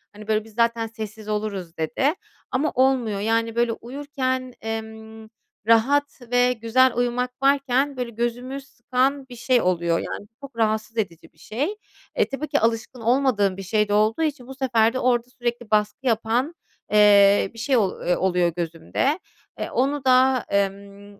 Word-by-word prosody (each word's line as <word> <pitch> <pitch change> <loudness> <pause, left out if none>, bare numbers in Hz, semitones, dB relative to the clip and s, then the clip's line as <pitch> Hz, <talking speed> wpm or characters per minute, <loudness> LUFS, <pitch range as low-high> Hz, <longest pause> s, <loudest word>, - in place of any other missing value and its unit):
Hani, 215 0 -1
"Biz 225 -1 -16
zaten 230 -1 +1
sessiz 220 -1 -8
oluruz." 200 -5 -3
dedi 245 - 0 0.4
ama 285 +4 0
olmuyor. 255 -5 +2
Yani, 225 +2 0
böyle 235 0 +2
uyurken, 260 0 -4
emm, 220 0 -7 0.4
rahat 275 +6 +3
ve 245 0 +4
güzel 245 +2 +3
uyumak 245 +1 0
varken 275 0 +2
böyle 250 -1 -3
gözümü 245 +4 -3
sıkan 265 +1 -1
bir 245 - -9
şey 240 +1 +2
oluyor, 170 -2 +1
yani. - - -5
Bu - - -54
çok 255 - -36
rahatsız 220 0 0
edici 170 -6 -4
bir - - -33
şey. 275 - -3 0.4
E, - - +1
tabii 275 +3 -4
ki - - +1
alışkın 230 +2 -1
olmadığım 230 -6 +2
bir 195 - -6
şey 210 +2 +1
de 205 - +1
olduğu 215 +6 +2
için 290 -5 -3
bu 265 - -9
sefer 235 -4 +2
de 260 - -2
orada 245 -1 +1
sürekli 240 -2 -4
baskı 215 +5 +1
yapan, 235 +6 +1 0.4
eee, 205 -2 +6
bir 230 - -11
şey 260 +3 +2
ol 200 -5 +2 0.3
oluyor 180 -2 +1
gözümde. 170 - -1 0.4
Eee, - - -3
onu 275 +1 0
da, 255 -1 +4
emm 200 0 -3
230 Hz, 160 wpm, -23 LUFS, 215-255 Hz, 0.4 s, eee